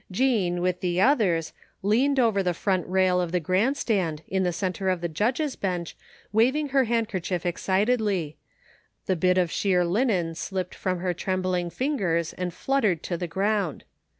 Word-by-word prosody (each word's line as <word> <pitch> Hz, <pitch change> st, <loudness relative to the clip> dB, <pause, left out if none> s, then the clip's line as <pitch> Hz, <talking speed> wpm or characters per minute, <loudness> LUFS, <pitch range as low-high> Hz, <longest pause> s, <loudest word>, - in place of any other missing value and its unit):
Jean, 190 Hz, -5 st, +1 dB
with 180 Hz, 0 st, 0 dB
the 180 Hz, -1 st, 0 dB
others, 190 Hz, -, +2 dB, 0.3 s
leaned 260 Hz, +7 st, +2 dB
over 225 Hz, -5 st, +3 dB
the 180 Hz, -2 st, 0 dB
front 185 Hz, -1 st, 0 dB
rail 185 Hz, 0 st, +2 dB
of 175 Hz, -2 st, -3 dB
the 180 Hz, -, +1 dB
grandstand, 185 Hz, -, 0 dB
in 190 Hz, 0 st, 0 dB
the 180 Hz, -1 st, +1 dB
centre 185 Hz, +1 st, -2 dB
of 185 Hz, -1 st, 0 dB
the 170 Hz, -, -2 dB
judges' 245 Hz, -, -1 dB
bench 180 Hz, -4 st, -3 dB, 0.4 s
wav 235 Hz, +6 st, +4 dB
ing 300 Hz, -1 st, -1 dB
her 270 Hz, -1 st, +3 dB
handkerchief 205 Hz, -6 st, -1 dB
excitedly; 195 Hz, -2 st, 0 dB, 0.7 s
the 185 Hz, -, +1 dB
bit 180 Hz, +2 st, +2 dB
of 180 Hz, -2 st, +2 dB
sheer 180 Hz, -3 st, +2 dB
linen 180 Hz, -3 st, +1 dB
slipped 185 Hz, +2 st, -4 dB
from 185 Hz, -2 st, -2 dB
her 180 Hz, -1 st, 0 dB
trembling 185 Hz, -1 st, -1 dB
fingers 175 Hz, -, -1 dB
and 180 Hz, -1 st, -3 dB
fluttered 210 Hz, -, 0 dB
to 175 Hz, -, -2 dB
the 175 Hz, +1 st, -3 dB
ground. 195 Hz, -1 st, -1 dB
185 Hz, 165 wpm, -26 LUFS, 175-220 Hz, 0.7 s, wav